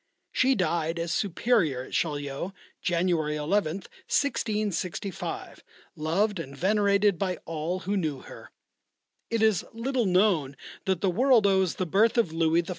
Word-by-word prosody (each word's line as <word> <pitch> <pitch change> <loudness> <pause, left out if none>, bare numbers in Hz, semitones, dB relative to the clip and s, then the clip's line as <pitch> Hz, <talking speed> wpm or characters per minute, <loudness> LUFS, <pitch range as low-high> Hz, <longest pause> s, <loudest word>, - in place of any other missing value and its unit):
She 265 +1 +3
died 170 -4 0
as 170 0 -2
Superior 180 - +1
at - - -12
Chaillot, 145 +3 -2 0.3
January 170 -3 +1
11th, 165 +3 -1 0.2
1665, 210 - -2 0.3
loved 175 +6 0
and 140 -3 -7
venerated 200 +1 +2
by 185 -2 -1
all 165 +3 -3
who 200 +2 -2
knew 155 -8 -1
her. - - -12 0.8
It 230 -1 +1
is 215 -5 +3
little 240 0 -1
known 180 -8 +2 0.3
that 190 -3 0
the 190 - +2
world 245 +1 +4
owes 190 -3 +3
the 185 - -1
birth 210 +8 +3
of 185 -9 +2
Louis 165 +1 +2
XIV. 170 - -12
185 Hz, 140 wpm, -27 LUFS, 160-210 Hz, 0.8 s, world